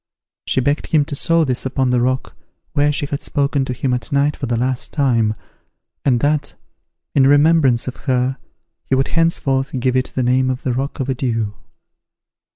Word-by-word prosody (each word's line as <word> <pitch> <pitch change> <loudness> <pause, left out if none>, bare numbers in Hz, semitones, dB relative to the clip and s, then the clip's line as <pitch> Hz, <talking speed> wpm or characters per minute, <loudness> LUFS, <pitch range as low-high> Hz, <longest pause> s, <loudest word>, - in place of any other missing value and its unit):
She 130 - +2
begged 145 +4 0
him 150 -3 +2
to 145 -1 -5
sow 165 +3 +3
this 130 -4 -1
upon 130 -1 0
the 125 -1 +2
rock 130 +1 -1 0.4
where 145 +1 +2
she 145 0 -2
had 140 0 -4
spoken 140 -2 0
to 125 - -4
him 125 +1 -1
at 120 -3 -3
night 145 +1 +2
for 135 - -5
the 120 0 0
last 125 +1 -1
time, 115 -7 +1 0.7
and 125 -4 +2
that, 150 0 0 0.6
in 135 -1 +4
remembrance 145 -4 +4
of 130 - -5
her, 130 0 +1 0.5
he 135 - +1
would 135 +1 +1
henceforth 135 -6 +1
give 130 0 0
it 130 0 0
the 130 - 0
name 130 +1 +2
of 130 0 -3
the 125 - 0
Rock 135 +4 -3
of 135 - -2
Adieus. 115 -5 -1
130 Hz, 185 wpm, -19 LUFS, 125-145 Hz, 0.7 s, in